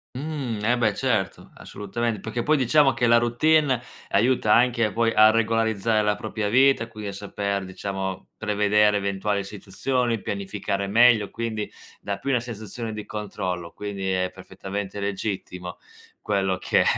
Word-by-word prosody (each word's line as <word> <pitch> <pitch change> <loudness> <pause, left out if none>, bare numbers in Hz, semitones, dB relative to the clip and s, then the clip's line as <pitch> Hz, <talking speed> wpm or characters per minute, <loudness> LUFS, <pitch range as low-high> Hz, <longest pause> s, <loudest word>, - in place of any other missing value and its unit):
Mh, 135 -6 -4
eh, 120 +3 +3
beh, 110 -4 +1
certo 110 -8 -1
assolutamen 110 +2 -4
perché 110 +4 -3
poi 155 +5 +2
diciamo 135 +2 +4
che 120 - 0
la 120 0 +6
routine 135 +3 +3 0.3
aiuta 115 0 +2
anche 120 -3 +3
poi 115 +2 +1
a 110 0 +7
regolarizzare 110 -1 +1
la 105 0 +1
propria 105 0 -3
vita, 130 0 +4
quindi 105 -2 -7
a - - -6
saper, 100 0 -3
diciamo, 95 0 -5
prevedere 105 -1 +2
eventuali 100 0 -1
situazioni, 115 +5 -2
pianificare 100 0 -3
meglio, 115 0 +5
quindi 110 -2 -4 0.3
dà 100 -1 -3
più 140 - -3
una 125 - +3
sensazione 115 -1 -6
di 105 -1 -6
controllo, 95 -5 -4
quindi 100 -2 -4
è 95 0 0
perfettamente 95 +1 -6
legittimo 95 -3 -4 0.5
quello 95 -3 0
che - - +2
105 Hz, 145 wpm, -24 LUFS, 100-120 Hz, 0.5 s, a